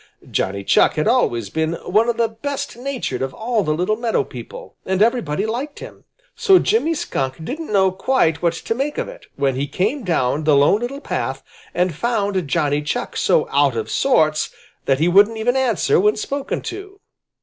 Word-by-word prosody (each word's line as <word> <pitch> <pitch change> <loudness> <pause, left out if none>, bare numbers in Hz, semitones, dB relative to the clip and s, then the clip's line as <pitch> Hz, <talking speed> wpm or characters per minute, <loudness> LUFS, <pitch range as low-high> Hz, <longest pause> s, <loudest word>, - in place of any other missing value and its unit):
Johnny 100 +1 -1
Chuck - - +3
had 155 - 0
always 120 - +1
been 160 +1 -1
one 210 +7 +1
of 235 - -1
the 230 - +2
best 270 +6 -5
natured 245 - -4
of 135 0 -3
all 225 -1 0
the 155 - -1
little 180 +6 0
meadow 230 -1 0
people, - - -10
and 190 0 -1
everybody 210 -6 +1
liked 255 +7 -4
him. - - -11 0.3
So 385 -2 +5
Jimmy 365 -5 +1
Skunk 135 - -3
didn't 310 - -5
know 190 -2 +3
quite 185 - +1
what 170 -1 +2
to 170 - -3
make 275 +5 -3
of - - -2
it, - - -12
when 140 -1 +1
he 135 +3 -2
came 195 - -1
down 155 -5 0
the 150 -1 +4
Lone 145 +9 +4
Little 275 +4 -4
Path - - -3 0.3
and 180 -1 +1
found 200 -3 -1
Johnny 145 -1 +1
Chuck 150 - -3
so - - +2
out 140 -4 +2
of 110 - -3
sorts 155 - +2 0.4
that 135 - +2
he 160 +4 +2
wouldn't 205 +5 +5
even 240 +3 0
answer 255 -10 +2
when 210 +3 +3
spoken 275 +6 -3
to. 395 0 -8
200 Hz, 190 wpm, -20 LUFS, 155-250 Hz, 0.4 s, So